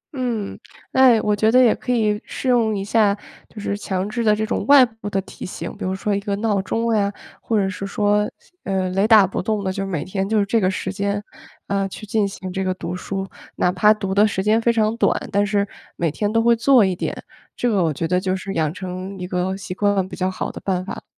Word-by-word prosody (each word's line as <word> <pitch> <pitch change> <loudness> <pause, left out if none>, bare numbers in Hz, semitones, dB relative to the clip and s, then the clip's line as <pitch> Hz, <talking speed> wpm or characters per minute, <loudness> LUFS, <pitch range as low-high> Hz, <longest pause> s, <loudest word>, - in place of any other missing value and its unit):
嗯， 240 -6 -3 0.3
哎， 255 -4 +6
我 210 0 +2
觉 215 +2 +2
得 255 - +6
也 235 - +5
可 250 - -4
以 215 -3 +1
试 260 - -6
用 230 -4 +3
一 195 - -3
下， 210 -2 +3 0.3
就 215 - -11
是 200 - -2
强 195 -1 -3
制 235 +2 -2
的 210 -1 +4
这 220 +1 -1
种 - - -2
外 280 -3 +8
部 225 -3 -8
的 195 - 0
提 - - -11
醒， 185 - -6
比 - - -8
如 190 0 -1
说 205 +2 -1
一 200 - 0
个 200 -1 -2
闹 205 -2 0
钟 230 +3 -1
呀， 200 -1 +1 0.3
或 225 - 0
者 195 -1 +2
是 195 +1 -5
说， 210 0 +1 0.3
呃， 190 -1 -1
雷 195 +3 +2
打 215 -3 +7
不 190 - -3
动 210 +1 -1
的， 190 -1 -1
就 195 0 -3
每 170 -6 -2
天 195 +1 -3
就 220 - +2
是 200 - +2
这 225 +2 +1
个 185 - +3
时 190 0 -3
间， 200 +1 -2 0.4
呃， 195 -1 -1
去 215 - -9
进 210 0 +1
行 190 -1 -7
这 190 - -1
个 185 -1 -1
读 180 -1 -5
书， 195 +1 -4 0.3
哪 180 - +2
怕 210 +4 +4
读 200 -3 -1
的 205 +2 +5
时 190 -2 -2
间 220 +2 +3
非 235 - +3
常 220 -1 +1
短， - - +2
但 205 0 +2
是 200 0 +1 0.3
每 165 -3 0
天 205 +5 -1
都 225 0 +2
会 235 0 +5
做 240 -2 +5
一 185 -1 0
点， - - -4 0.3
这 245 - -1
个 200 -6 +2
我 160 - +1
觉 165 +3 -2
得 180 +1 +2
就 185 0 -1
是 195 +1 -5
养 155 -3 0
成 185 +2 -6
一 180 - -5
个 180 +1 -2
习 195 -2 -6
惯 200 -1 +1
比 - - -8
较 185 0 0
好 185 - -4
的 - - -9
办 185 -1 -1
法。 195 - -7
200 Hz, 270 characters per minute, -21 LUFS, 190-220 Hz, 0.4 s, 外